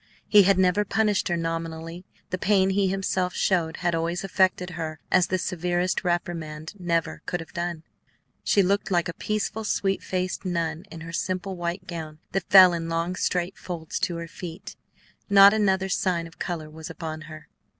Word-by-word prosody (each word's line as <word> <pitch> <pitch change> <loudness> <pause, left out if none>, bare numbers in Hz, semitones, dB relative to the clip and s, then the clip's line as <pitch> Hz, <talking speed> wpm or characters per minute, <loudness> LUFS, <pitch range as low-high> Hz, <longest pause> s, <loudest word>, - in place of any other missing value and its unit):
He 210 - +7
had 195 0 +4
never 185 +2 +3
punished 210 0 +1
her 175 - 0
nominally; 165 +1 -4 0.3
the 185 - -2
pain 195 -1 +3
he 195 0 +2
himself 185 -1 -1
showed 170 -4 +1
had 175 - +2
always 170 +2 -1
affected 185 -1 +1
her 155 -2 -5
as 185 -2 +4
the 185 - 0
severest 180 0 -1
reprimand 165 -3 -3
never 170 -2 -1
could 175 - -1
have 165 - -10
done. 170 -2 -3 0.6
She 200 - +4
looked 200 +2 +1
like 175 -3 +1
a 175 - -4
peaceful, 215 +3 -2
sweet 195 -2 0
faced 185 0 -3
nun 170 -1 -2
in 165 - -9
her 165 +1 -8
simple 185 +2 -2
white 175 +1 -4
gown, 160 -3 -7
that 190 -2 -2
fell 185 -2 +9
in 165 -1 -3
long 165 +2 -1
straight 180 +1 -1
folds 165 -3 -5
to 175 - -1
her 170 0 -5
feet; 170 +2 -8 0.5
not 200 0 +8
another 190 -3 +2
sign 180 -3 0
of 165 +1 -14
color 165 -4 -4
was 155 +1 -9
upon 160 -1 -6
her. 155 0 -11
175 Hz, 180 wpm, -25 LUFS, 165-190 Hz, 0.6 s, fell